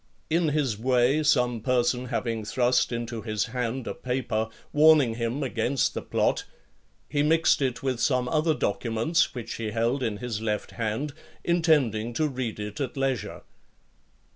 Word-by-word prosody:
In 165 0 +2
his 140 -8 0
way, 125 +4 +3
some 125 -6 +2
person 125 0 +1
having 115 -2 -2
thrust 125 +4 +1
into 120 -1 -4
his 110 -2 -1
hand 125 0 -2
a - - -3
paper, 120 -3 -2 0.2
warning 150 -5 +6
him 115 +5 -2
against 125 +1 0
the - - -3
plot, - - 0 0.6
he 145 - 0
mixed 160 0 +3
it 130 -1 -1
with 130 -3 -1
some 125 -2 +1
other 155 +2 +2
documents 115 +11 0
which 120 -1 -5
he 115 -2 -3
held 115 +5 0
in 110 -4 -1
his 115 -1 -4
left 105 -2 -2
hand, 115 +6 -3 0.3
intending 145 -10 +2
to 155 +6 +1
read 125 -6 -4
it 105 +4 -5
at 135 0 -3
leisure. 135 -5 -2
125 Hz, 155 wpm, -26 LUFS, 115-140 Hz, 0.6 s, warning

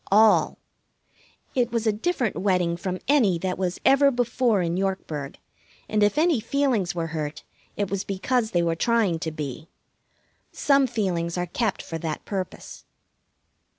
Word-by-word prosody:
All. 215 +2 +5 1.0
It 245 -2 +1
was 230 -1 -1
a 220 - +4
different 245 - -1
wedding 180 -3 +1
from 180 +1 -3
any 235 -12 +4
that 185 +1 -3
was 185 -1 -1
ever 275 +1 +6
before 240 -5 +1
in 170 0 -1
Yorkburg, 180 -7 -3 0.5
and 215 0 0
if 205 +7 +3
any 320 -4 +3
feelings 230 -7 0
were 165 -1 -1
hurt 150 -1 -4 0.3
it 200 -2 -2
was 200 -1 -1
because 220 +4 -1
they 175 -3 +1
were 165 -1 +1
trying 210 -4 +1
to 160 - -3
be. 150 0 -6 0.8
Some 275 -2 +3
feelings 180 -7 -2
are 180 - 0
kept 210 +3 -2
for 165 - -5
that 155 -1 -4
purpose. 190 -3 -6
195 Hz, 150 wpm, -25 LUFS, 170-235 Hz, 1.0 s, ever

